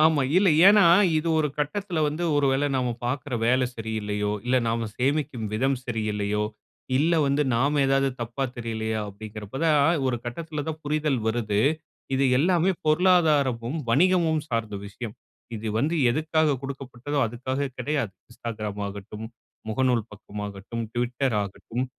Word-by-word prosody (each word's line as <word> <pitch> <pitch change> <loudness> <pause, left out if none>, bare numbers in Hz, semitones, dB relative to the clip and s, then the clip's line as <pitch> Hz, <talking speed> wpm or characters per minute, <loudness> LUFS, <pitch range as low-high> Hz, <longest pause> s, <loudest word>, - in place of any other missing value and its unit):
ஆமா, 155 -2 +4
இல்ல. 190 +1 +5 0.2
ஏனா, 210 0 +7 0.4
இது 160 +2 -2
ஒரு 155 -1 +2
கட்டத்தில 175 +4 -2
வந்து 150 +3 -2
ஒரு 145 -1 +3
வேள 135 +2 +1
நாம 125 -1 0 0.2
பார்க்குற 130 +2 -2
வேலை 125 +2 +3
சரியில்லயோ, 105 -2 -2
இல்ல 130 +1 +3
நாம 115 0 -1
சேமிக்கும் 130 -3 0
விதம் 135 +5 +1
சரியில்லையோ, 105 -3 -1 0.5
இல்ல 155 +5 +3
வந்து 140 +2 +2
நாம 140 +5 +2
ஏதாவது 135 0 +3
தப்பா 120 +4 -2
தெரியலயா. 110 -2 -2
அப்டிங்கிறப்ப 105 +3 -8
தான் 155 0 +4
ஒரு 125 - 0
கட்டத்தில 150 +5 -4
தான் 155 0 -4
புரிதல் 150 -2 0
வருது. 110 -3 0 0.5
இது 135 +1 +2
எல்லாமே 175 +4 +3 0.2
பொருளாதாரமும், 155 -6 +3
வணிகமும் 165 +2 +3
சார்ந்த 115 -3 -2
விஷயம். 110 +2 -7 0.4
இது 110 +1 -6
வந்து 150 +8 +1 0.2
எதுக்காக 155 +1 +1
குடுக்கப்பட்டதோ 135 0 -5
அதுக்காக 130 +4 -3
கெடையாது. 130 -4 -1 0.2
Instagram 110 -3 -5
ஆகட்டும், 100 +2 -7 0.4
முகநூல் 125 0 +1
பக்கமாகட்டும், 105 +1 -6
Twitter 120 +2 0
ஆகட்டும், 110 +5 -4
130 Hz, 135 wpm, -25 LUFS, 110-150 Hz, 0.5 s, ஏனா